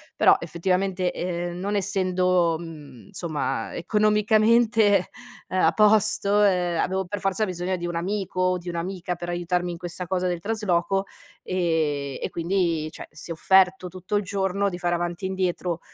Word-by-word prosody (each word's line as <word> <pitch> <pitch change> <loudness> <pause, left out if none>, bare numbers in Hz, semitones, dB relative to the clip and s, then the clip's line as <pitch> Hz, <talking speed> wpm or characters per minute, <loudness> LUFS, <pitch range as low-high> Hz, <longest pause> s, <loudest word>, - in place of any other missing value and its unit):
però, - - +6
effettivamente, 180 +2 -1
ehm, 175 0 -3
non 200 +3 -2
essendo, 185 -3 +1
mhmm, 150 -7 -11
insomma, 145 - -3
ehm, - - -5
economicamente, 215 +1 +3 0.4
ehm, 185 - 0
a 160 - +5
posto, 210 -1 +4
ehm, 180 -4 +2
avevo 190 +2 0
per 205 +3 -5
forza 195 +3 0
bisogno 180 0 -2
di 175 - -5
un 175 0 -3
amico, 185 +1 -2
o 185 0 +2
di 175 0 -7
un'amica, 180 +1 -3
per 175 0 -6
aiutarmi 175 0 -1
in 170 - -6
questa 175 +1 -6
cosa 185 0 0
del 175 -1 -2
trasloco, 195 -2 0 0.4
ehm, 155 -6 -1
e - - -1
quindi, 170 -3 0
cioè, - - -9
si 155 +3 -11
è - - -2
offerto 185 +2 +3
tutto 185 +3 -5
il 205 - +1
giorno 195 +1 0
di 175 - -6
fare 175 -1 0
avanti 175 +1 -3
e - - +1
indietro, 180 -2 -2
180 Hz, 170 wpm, -24 LUFS, 170-195 Hz, 0.4 s, però